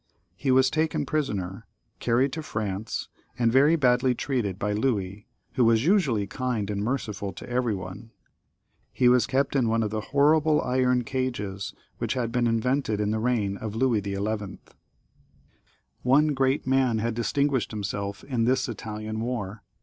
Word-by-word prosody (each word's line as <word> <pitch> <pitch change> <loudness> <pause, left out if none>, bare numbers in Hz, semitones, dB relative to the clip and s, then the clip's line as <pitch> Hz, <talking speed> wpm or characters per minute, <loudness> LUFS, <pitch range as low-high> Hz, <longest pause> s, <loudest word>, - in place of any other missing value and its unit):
He 135 +7 -3
was 130 0 +4
taken 160 0 0
prisoner, 100 -12 -3 0.3
carried 125 +3 +1
to 160 - -3
France, 110 -6 -4 0.3
and 120 -2 +2
very 140 +6 +5
badly 125 -3 +3
treated 115 -9 -2
by 105 +1 -1
Louis, 105 -3 -1 0.3
who 125 - +2
was 115 +2 +4
usually 155 - +3
kind 115 -2 -2
and 100 0 -2
merciful 105 -5 -2
to - - -10
every 120 -3 0
one. 95 +4 -8 0.8
He 125 - +2
was 125 0 +4
kept 140 +1 0
in 125 -4 +2
one 115 0 +2
of 105 - -2
the 110 0 -2
horrible 150 +4 +3
iron 125 -1 +2
cages 110 -6 -3 0.2
which - - -1
had 120 -3 -1
been 120 0 +1
invented 115 -1 0
in 105 0 0
the 110 - 0
reign 110 -4 0
of 110 0 -5
Louis 120 -3 +2
XI. 100 0 -3 1.4
One 140 +5 +4
great 135 -1 +1
man 130 -3 +2
had 115 +1 -1
distinguished 130 +3 0
himself 100 -1 -4
in 120 -5 -1
this 130 +3 +2
Italian 110 -1 -5
war. 115 -4 -4
120 Hz, 155 wpm, -26 LUFS, 105-130 Hz, 1.4 s, very